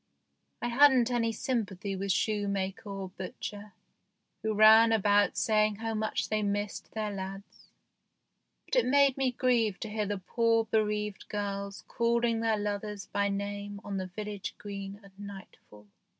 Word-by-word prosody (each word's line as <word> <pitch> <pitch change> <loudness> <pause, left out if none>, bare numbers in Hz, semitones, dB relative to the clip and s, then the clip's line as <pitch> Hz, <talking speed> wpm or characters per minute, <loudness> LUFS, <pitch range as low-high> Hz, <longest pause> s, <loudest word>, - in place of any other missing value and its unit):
I 240 - 0
hadn't 255 -1 +5
any 230 -2 +1
sympathy 205 -5 -2
with 195 +1 -1
shoemaker 200 0 -1
or 195 -1 -5
butcher, 200 +2 -7 0.7
who 220 0 -1
ran 220 +2 +8
about 205 -2 +3
saying 215 -1 +2
how 225 +2 -3
much 215 0 -1
they 215 0 +1
missed 205 0 -3
their 215 -1 -2
lads, 195 0 -8 1.0
but - - -3
it - - +3
made 280 0 +5
me 265 -2 +1
grieve 235 -5 +1
to 220 - -4
hear 210 -1 -1
the 205 0 -2
poor 230 +4 +1
bereaved 210 -2 -1
girls 200 0 -4
calling 235 -1 +1
their 225 -1 +1
lovers 205 -1 -3
by 200 0 0
name 200 0 -4
on 200 -1 -4
the 185 -1 -3
village 205 +1 -6
green 200 -1 -7
at 200 - -15
nightfall. 195 - -11
210 Hz, 150 wpm, -30 LUFS, 200-225 Hz, 1.0 s, ran